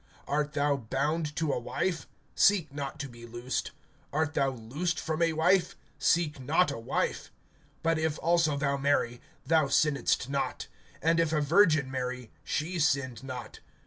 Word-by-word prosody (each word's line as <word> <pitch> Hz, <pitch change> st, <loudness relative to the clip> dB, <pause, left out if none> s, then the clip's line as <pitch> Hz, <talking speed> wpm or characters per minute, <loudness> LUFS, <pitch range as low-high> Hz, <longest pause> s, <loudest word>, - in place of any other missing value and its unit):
(27)Art 150 Hz, +1 st, 0 dB
thou 145 Hz, -1 st, +2 dB
bound 150 Hz, +6 st, -2 dB
to 160 Hz, -3 st, 0 dB
a -, -, -1 dB
wife? 170 Hz, +8 st, -2 dB, 0.3 s
Seek 175 Hz, -8 st, +3 dB
not 140 Hz, 0 st, -5 dB
to 145 Hz, -, -4 dB
be 120 Hz, -2 st, -12 dB
loosed. 120 Hz, +2 st, -3 dB, 0.4 s
Art 155 Hz, +2 st, 0 dB
thou 140 Hz, -3 st, +2 dB
loosed 140 Hz, +8 st, -3 dB
from 160 Hz, +1 st, -2 dB
a 165 Hz, -1 st, +3 dB
wife? 175 Hz, +4 st, +3 dB, 0.2 s
Seek 160 Hz, -4 st, +2 dB
not 155 Hz, +8 st, +2 dB
a -, -, -5 dB
wife. 115 Hz, -, -2 dB, 0.5 s
(28)But 165 Hz, 0 st, +2 dB
if 160 Hz, -1 st, 0 dB
also 165 Hz, -3 st, +2 dB
thou 140 Hz, -1 st, 0 dB
marry, 135 Hz, -4 st, +1 dB, 0.2 s
thou 160 Hz, -2 st, +4 dB
sinnedst 140 Hz, -3 st, +2 dB
not; 140 Hz, 0 st, -2 dB, 0.4 s
and 165 Hz, +1 st, +3 dB
if 165 Hz, -2 st, +2 dB
a 155 Hz, -, +2 dB
virgin 155 Hz, -3 st, +4 dB
marry, 125 Hz, -2 st, -4 dB
she 170 Hz, +4 st, -2 dB
sinned 135 Hz, -5 st, +1 dB
not. 130 Hz, -2 st, -7 dB
145 Hz, 160 wpm, -29 LUFS, 135-160 Hz, 0.5 s, thou